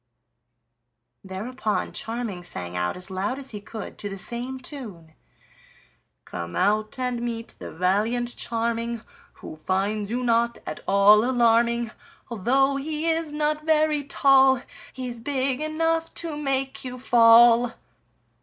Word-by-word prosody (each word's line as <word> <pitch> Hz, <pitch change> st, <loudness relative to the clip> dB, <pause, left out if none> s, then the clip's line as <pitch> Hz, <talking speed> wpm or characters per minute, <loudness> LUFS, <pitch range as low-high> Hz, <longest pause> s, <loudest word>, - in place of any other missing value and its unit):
Thereupon 215 Hz, +4 st, -3 dB
Charming 225 Hz, -6 st, -4 dB
sang 90 Hz, -, -4 dB
out 90 Hz, -, -1 dB
as 180 Hz, +1 st, -6 dB
loud 195 Hz, +7 st, -2 dB
as 270 Hz, -1 st, -5 dB
he 210 Hz, -2 st, -7 dB
could 215 Hz, +1 st, -8 dB
to 205 Hz, -, -4 dB
the 195 Hz, -, -6 dB
same 245 Hz, +6 st, -3 dB
tune: 215 Hz, -, -9 dB, 1.1 s
"Come 85 Hz, -1 st, -6 dB
out 215 Hz, +4 st, +1 dB
and 250 Hz, -2 st, -2 dB
meet 230 Hz, -1 st, -4 dB
the -, -, -8 dB
valiant 215 Hz, +8 st, 0 dB
Charming 230 Hz, 0 st, -2 dB, 0.3 s
Who -, -, -10 dB
finds 200 Hz, +5 st, -1 dB
you 245 Hz, +2 st, -2 dB
not 235 Hz, 0 st, +2 dB
at 155 Hz, -, -5 dB
all 200 Hz, +2 st, +6 dB
alarming; 235 Hz, -1 st, +2 dB, 0.4 s
Although 270 Hz, +6 st, +2 dB
he 310 Hz, +3 st, -1 dB
is 325 Hz, -1 st, -2 dB
not 300 Hz, 0 st, -1 dB
very 310 Hz, -2 st, +2 dB
tall, 270 Hz, -2 st, +4 dB, 0.3 s
He's 250 Hz, -2 st, -6 dB
big 265 Hz, +1 st, -1 dB
enough 325 Hz, +1 st, 0 dB
to 330 Hz, -3 st, -2 dB
make 270 Hz, -2 st, -2 dB
you 255 Hz, -1 st, -6 dB
fall." 235 Hz, -1 st, +6 dB
235 Hz, 130 wpm, -24 LUFS, 210-270 Hz, 1.1 s, all